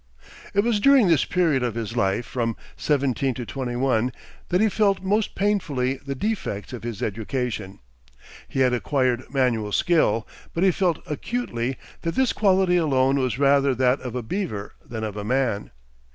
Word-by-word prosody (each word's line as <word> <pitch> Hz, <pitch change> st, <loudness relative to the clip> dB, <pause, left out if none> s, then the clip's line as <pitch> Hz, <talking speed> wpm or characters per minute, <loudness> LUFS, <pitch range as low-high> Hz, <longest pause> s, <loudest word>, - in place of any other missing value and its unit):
It 200 Hz, -, +5 dB
was 225 Hz, -1 st, +1 dB
during 265 Hz, -1 st, +6 dB
this 160 Hz, -5 st, +4 dB
period 165 Hz, -7 st, +2 dB
of 120 Hz, -2 st, -1 dB
his 115 Hz, 0 st, -4 dB
life, 100 Hz, +1 st, +1 dB
from 115 Hz, 0 st, -2 dB, 0.2 s
seventeen 135 Hz, -3 st, 0 dB
to 125 Hz, -, -5 dB
twenty 125 Hz, -1 st, -4 dB
one, 125 Hz, -1 st, +1 dB, 0.4 s
that 180 Hz, -, +2 dB
he 220 Hz, -, +4 dB
felt 200 Hz, -2 st, +1 dB
most 205 Hz, +3 st, 0 dB
painfully 150 Hz, -11 st, 0 dB
the 140 Hz, -1 st, -4 dB
defects 135 Hz, -, -3 dB
of 120 Hz, -, -6 dB
his 115 Hz, -2 st, -5 dB
education. 110 Hz, -2 st, -3 dB, 0.7 s
He 135 Hz, -, -1 dB
had 125 Hz, -1 st, +4 dB
acquired 125 Hz, -1 st, 0 dB
manual 120 Hz, -6 st, +1 dB
skill, 115 Hz, -7 st, +2 dB, 0.3 s
but 170 Hz, -, +1 dB
he 190 Hz, -, +5 dB
felt 175 Hz, -2 st, 0 dB
acutely 135 Hz, -, -3 dB, 0.2 s
that 165 Hz, -1 st, -2 dB
this 260 Hz, -2 st, +2 dB
quality 190 Hz, -3 st, +3 dB
alone 135 Hz, -4 st, +2 dB
was 125 Hz, -4 st, 0 dB
rather 140 Hz, -1 st, +3 dB
that 125 Hz, +2 st, +2 dB
of 125 Hz, -2 st, -6 dB
a 125 Hz, -, -2 dB
beaver 110 Hz, -, -4 dB
than 110 Hz, -2 st, -6 dB
of 105 Hz, -2 st, -4 dB
a 105 Hz, -, -4 dB
man. 120 Hz, -3 st, 0 dB
130 Hz, 170 wpm, -24 LUFS, 120-175 Hz, 0.7 s, during